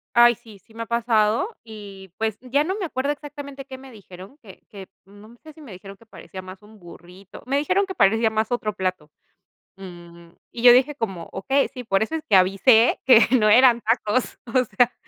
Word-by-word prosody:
Ay 240 0 +6
sí, 225 -3 -17
sí 220 +3 -25
me 230 - -6
ha - - -20
pasado 235 - 0
y, 200 -4 -12
pues, 220 -2 -3
ya 270 +4 -1
no 375 +3 -3
me 375 - -3
acuerdo 280 -1 -2
exactamente 285 -2 -10
qué 260 -1 -10
me 265 0 -14
dijeron, 190 +2 -14
que 195 -4 -16
que, 195 -3 -11 0.2
mm, 200 +1 -18
no 220 +3 -16
sé 310 -1 -13
si 315 - -18
me 270 -8 -12
dijeron 195 +2 -12
que 230 - -23
parecía 190 -3 -11
más 185 +1 -12
un 215 +1 -18
burrito. 180 +2 -15
Me 275 +2 0
dijeron 370 +7 0
que 380 - -7
parecía 225 - +2
más 220 0 -2
otro 230 -3 -2
plato. 185 -5 -4 0.7
Mm, 175 -3 -13 0.2
y 235 - -8
yo 245 - +9
dije 270 +3 +2
como: 190 - -6
"Okey, 275 +6 0
sí, 250 - -9
por 195 -3 0
eso 270 +9 -5
es 315 - -5
que 200 - +4
avisé 195 +6 +4
que 245 -3 +7 0.2
no 215 -1 +2
eran 240 +1 +5
tacos", 225 +1 -1 0.2
o 255 -1 +3
sea, 240 +4 +1
225 Hz, 215 wpm, -22 LUFS, 195-260 Hz, 0.7 s, yo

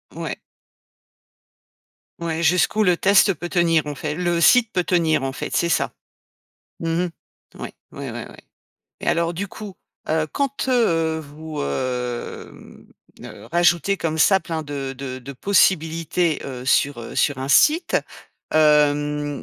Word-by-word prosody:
Ouais. - - -5 1.8
Ouais, 170 -1 -3
jusqu'où 180 +6 +3
le 180 -3 +3
test 195 +1 +4
peut 175 - -6
tenir, 170 -3 +2
en 145 - -4
fai 150 +1 -4
le 175 +1 -1
site 235 +3 +5
peut 180 - +1
tenir, 165 -5 +1
en 135 - -2
fait, 130 - -5
c'est 170 - +1
ça? 160 - 0 0.9
Mmh 165 +1 0
mh. 180 - -4 0.5
Ouais, - - -6 0.2
ouais, - - -6
ouais, - - -7
ouais - - -14 0.6
et - - -7
alors, 170 0 +1
du 200 +4 -4
coup, 205 -1 -9 0.3
heu, 155 0 +1
quand, 275 -1 -2
heu, 165 -11 +2
vous, 155 +1 -8
hem, 125 - -5 0.3
ne - - -11
rajoutez 175 +2 +3
comme 160 -1 -2
ça 190 +5 +5
plein 160 -1 -4
de 140 -2 -5
de 130 -1 -6
de 135 +2 -9
possibilités, 165 0 +1
heu, 125 -2 -7
sur, 135 -1 +2
heu, 115 - -8
sur 145 - +1
un 135 +1 -4
site, 315 - +4 0.6
hem, 150 -1 +2
160 Hz, 150 wpm, -22 LUFS, 145-180 Hz, 1.8 s, site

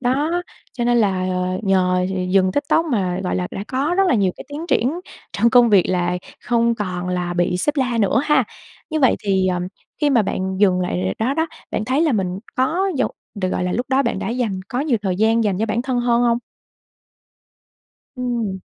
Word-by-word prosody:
Đó, 295 +8 0 0.3
cho 240 - -3
nên 240 0 +3
là, 190 -4 +1
ờ, 185 0 -1
nhờ 185 -2 +2
d 190 - -3 0.2
dừng 185 -1 +3
TikTok 285 - +1
mà, 190 - -1
gọi - - -1
là, 180 - -1
đã 195 - -5
có 280 +6 0
rất 390 - +4
là - - +3
nhiều 195 -5 +2
cái - - -9
tiến 300 +4 -6
triển 290 +4 +1 0.3
trong 235 - +2
công 245 -1 +6
việc 200 -3 +6
là 180 -1 0 0.3
không 235 -1 +2
còn 180 -4 -4
là 180 -1 -2
bị 175 0 +1
sếp 295 +11 0
la 250 -4 0
nữa 205 +3 +3
ha. 300 - +3 0.5
Như 310 -1 -1
vậy 260 - +4
thì, 190 -2 +2
ờ, 180 -1 0 0.4
khi 295 -1 +3
mà 240 -5 +4
bạn 190 -1 -2
dùng 185 -3 +4
lại 95 - -1
đó 250 +5 0
đó, 320 +2 +1 0.2
bạn 215 - -2
thấy 260 +5 +1
là 315 -5 +2
mình 185 -3 -1 0.2
có 330 +10 +1
dù 260 - +2 0.3
được, 190 -3 -2
gọi 180 - -1
là, 180 - -1
lúc 245 +2 -1
đó 265 +1 +3
bạn 235 -6 -1
đã 195 - -3
dành 230 -6 -2
có 250 - -2
nhiều 285 -5 +1
thời 185 -3 -1
gian 225 +2 +3
dành 195 -3 0
cho 220 - 0
bản 230 +2 -1
thân 255 -2 -1
hơn 240 0 +2
hông? 235 -1 +3 1.8
Ừm. 235 -6 -2
225 Hz, 220 wpm, -20 LUFS, 185-255 Hz, 1.8 s, công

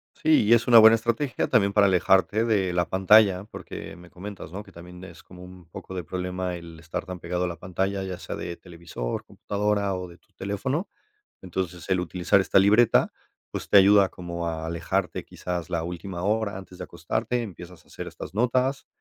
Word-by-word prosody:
Sí, 155 -7 +3
y 110 - +4
es 115 0 +3
una 120 -2 +9
buena 110 +1 +8
estrategia 115 +5 -1
también 100 -5 +3
para 100 -1 +4
alejarte 95 +4 +3
de 100 -6 +1
la 90 -1 0
pantalla, 95 0 +4
porque - - -9
me 85 0 -15
comentas, 95 -2 -9
¿no?, 100 +4 -6
que - - -17
también 90 +1 -12
es 85 -1 -13
como 90 0 -13
un 90 -1 -13
poco 95 - -9
de 90 - -4
problema 90 +1 -4
el 85 -1 -10
estar 80 +3 -5
tan 90 -1 -7
pegado 90 +1 -2
a - - -1
la 85 - -5
pantalla, 95 +2 -2
ya 95 -1 -6
sea - - -6
de 85 -1 -6
televisor, 85 -9 -6
computadora 100 -1 -1
o 90 -1 -6
de 85 - -15
tu - - -37
teléfono. 130 - -3 0.5
Entonces, 90 -1 -5
el 95 -1 +2
utilizar 90 +2 +1
esta 95 - +3
libreta, 105 +4 +4 0.4
pues, - - -6
te 100 - +7
ayuda 100 0 +6
como 85 -1 -6
a 80 -1 -3
alejarte 85 +3 -2
quizás 90 -2 -5
la 85 -1 -2
última 90 +1 -6
hora 105 0 0
antes 95 -1 -11
de - - -5
acostarte, 110 +8 -2
empiezas 90 -5 -10
a - - -27
hacer - - -8
estas - - -9
notas, 125 +4 0
95 Hz, 200 wpm, -25 LUFS, 90-105 Hz, 0.5 s, una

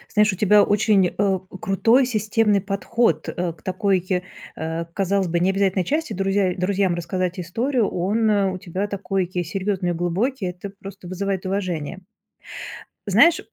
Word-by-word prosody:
Знаешь, 210 0 +5
у 190 - -6
тебя 210 0 +5
очень, 205 -2 +3
э, 195 0 0 0.2
крутой 230 +7 +3
системный 215 -3 +1
подход, 200 -3 0
э, 175 -1 -2
к 160 - -17
такой, 185 -1 0 0.3
э, 160 +1 -3
казалось 195 -1 0
бы, 170 +1 0
необязательной 190 0 +2
части: 310 - -1
друзья 195 -1 +1
друзьям 190 -1 +1
рассказать 180 +1 -2
историю. 225 +7 0
Он, 210 +5 0
э, 200 -2 +2
у - - -4
тебя 185 +3 -3
такой 195 -2 -2
серьёзный, 185 +1 -2
глубокий. 190 +7 -1
Это 180 +2 -5
просто 195 -2 -10
вызывает 190 0 -2
уважение. 185 -3 -3 1.1
Знаешь, 340 +3 +5
195 Hz, 140 wpm, -22 LUFS, 180-205 Hz, 1.1 s, Знаешь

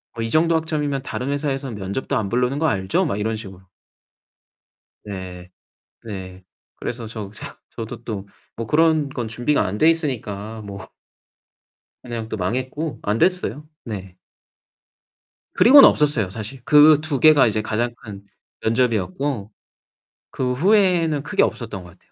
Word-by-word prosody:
"뭐 115 - -3
이 115 - -2
정도 165 +4 +3
학점이면 150 -4 -1
다른 130 0 -4
회사에서는 140 -3 -2
면접도 100 +6 -3
안 105 -3 -1
부르는 125 +4 0
거 160 - +2
알죠?" 95 -7 0
막 100 - -2
이런 110 +1 -1
식으로. 95 -4 -9 1.4
네. 90 -3 -8 0.5
네. 95 -4 -8 0.3
그래서 120 -2 -5
저 110 -3 -7
저 110 - -8 0.2
저도 115 0 -8
또 100 -4 -5 0.3
뭐 115 -1 -5
그런 155 -1 +3
건 120 -4 -4
준비가 120 +3 +1
안 100 +2 -3
돼 160 - +5
있으니까 110 - -2
뭐 100 -1 -8 1.2
그냥 115 -2 -5
또 - - -3
망했고 130 - -3
안 105 +2 -1
됐어요. 175 -3 0 0.2
네. 95 -5 -7 1.4
그리고는 275 +4 +9
없었어요, 140 -10 +2
사실. 115 +5 -7
그 150 +1 +7
2 150 -4 -1
개가 155 -4 +6
이제 110 0 0
가장 115 +2 -1
큰 100 -3 -9 0.4
면접이었고 115 0 -1 0.8
그 125 -1 -1
후에는 175 -2 +3
크게 205 +2 +2
없었던 105 -6 -3
것 90 - -13
같아요. 90 +1 -23
120 Hz, 275 characters per minute, -22 LUFS, 105-150 Hz, 1.4 s, 그리고는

